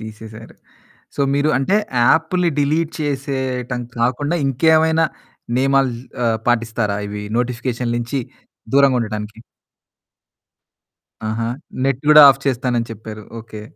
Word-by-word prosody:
తీసేసారు. 110 0 -10 0.6
సో, 140 - -1
మీరు 145 +2 +2
అంటే 135 +9 +1 0.3
యాప్లు 165 +4 +2
డిలీట్ 155 +3 +1
చేసేయటం 130 -3 -3 0.2
కాకుండా, 135 +7 0
ఇంకేమైనా 160 +4 +3 0.5
నియమాలు 135 -1 +2 0.3
ఆహ్, 115 -1 +1
పాటిస్తారా? 115 -3 0
ఇవి 105 0 -6 0.2
నోటిఫికేషన్ 125 -1 -2
నుంచి 120 +3 -2 0.5
దూరంగా 140 -2 +5
ఉండటానికి. 105 -1 -5 1.9
ఆహా! 115 +1 -2 0.4
నెట్ 135 -1 0
గూడా 150 0 +9
ఆఫ్ 135 - -7
చేస్తాను 125 -2 0
అని 115 - -3
చెప్పారు. 110 0 -9 0.2
ఓకె. 110 -1 -10
125 Hz, 110 wpm, -19 LUFS, 115-140 Hz, 1.9 s, గూడా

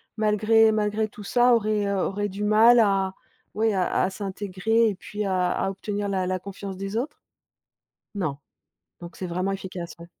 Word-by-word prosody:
malgré 220 +1 +4
malgré 215 0 0
tout 210 0 -12
ça 245 +4 +4
aurait, 215 -2 0
heu 200 - 0
aurait 205 +2 -1
du 200 +2 -5
mal 220 +3 +6
à, 195 -3 +2 0.4
ouais, 220 0 +2
à 185 -2 +1
à - - +1
s'intégrer 205 +3 0
et 205 - -3
puis 210 +3 -5
à 185 -2 +1
à - - -1
obtenir 205 +1 -4
la 190 -2 -1
la 185 0 0
confiance 195 0 -7
des 195 +3 -4
autres? 285 +5 -4 1.0
Non? 180 -9 -2 0.6
Donc 175 0 -10
c'est 185 - -5
vraiment 180 +3 -2
efficace, 185 -3 -6
ouais. 170 - -11
200 Hz, 175 wpm, -25 LUFS, 190-215 Hz, 1.0 s, mal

